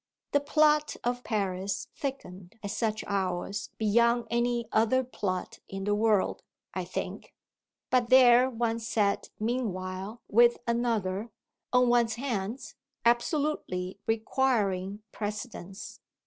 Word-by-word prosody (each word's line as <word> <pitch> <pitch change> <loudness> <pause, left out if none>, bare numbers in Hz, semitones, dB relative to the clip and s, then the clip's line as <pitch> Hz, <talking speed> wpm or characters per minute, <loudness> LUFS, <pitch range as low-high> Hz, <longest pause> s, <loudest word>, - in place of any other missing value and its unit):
The 285 - +4
"plot" 300 +1 +3
of 245 +1 -1
Paris 195 -3 -2
thickened 190 -10 -6
at 200 - -3
such 220 -1 -1
hours 195 0 -2
beyond 235 +2 +3
any 235 0 +1
other 230 +4 +3
plot 190 -7 -4
in 195 0 -5
the 205 +1 +1
world, 210 -1 +2 0.3
I - - -3
think; - - -6 0.6
but 250 -2 +3
there 255 -1 +7
one 230 -2 -1
sat 215 -3 0
meanwhile 210 -2 -3
with 235 +2 +5
another, 230 -3 0 0.4
on 250 0 +4
one's 235 -2 +3
hands, 235 -2 -3 0.3
absolutely 235 - 0
requiring 215 -4 0
precedence. 205 -2 -6
225 Hz, 110 wpm, -29 LUFS, 200-245 Hz, 0.6 s, there